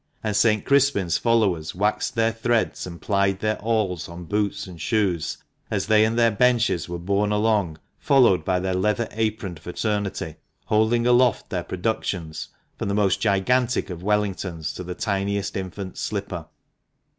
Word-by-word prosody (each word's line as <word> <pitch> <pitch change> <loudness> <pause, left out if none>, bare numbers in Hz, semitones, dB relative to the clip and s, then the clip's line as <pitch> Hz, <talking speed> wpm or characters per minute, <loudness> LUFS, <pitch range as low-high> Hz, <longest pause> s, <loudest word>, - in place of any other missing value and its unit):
And 105 -2 -1
St. 110 -1 +3
Crispin's 135 - +2
followers 100 -10 +1
waxed 105 +5 0
their 115 0 +2
threads 115 -3 0
and 85 -1 -8
plied 100 -2 +1
their 110 +1 -1
awls 105 -7 -1
on 85 +1 -8
boots 105 +3 -1
and 90 -4 -10
shoes 100 -8 0 0.3
as 100 -3 -1
they 110 0 +5
and 115 +1 -1
their 115 -1 +4
benches 115 -6 +2
were 85 - -3
borne 100 +4 0
along, 105 -6 +1 0.2
followed 120 - +4
by 90 +1 +1
their 95 +1 -1
leather 105 +5 +1
aproned 110 -6 -2
fraternity, 100 -1 -3 0.3
holding 110 +2 +2
aloft 125 0 +3
their 90 - -1
productions, 90 -4 -3 0.3
from - - -2
the 100 - 0
most 100 -2 +2
gigantic 115 +3 +1
of 85 -1 -7
Wellingtons 95 -5 -1
to 90 - -6
the 90 0 -6
tiniest 100 0 -1
infant's 95 0 -5
slipper. 95 -6 -4
100 Hz, 155 wpm, -24 LUFS, 90-110 Hz, 0.3 s, they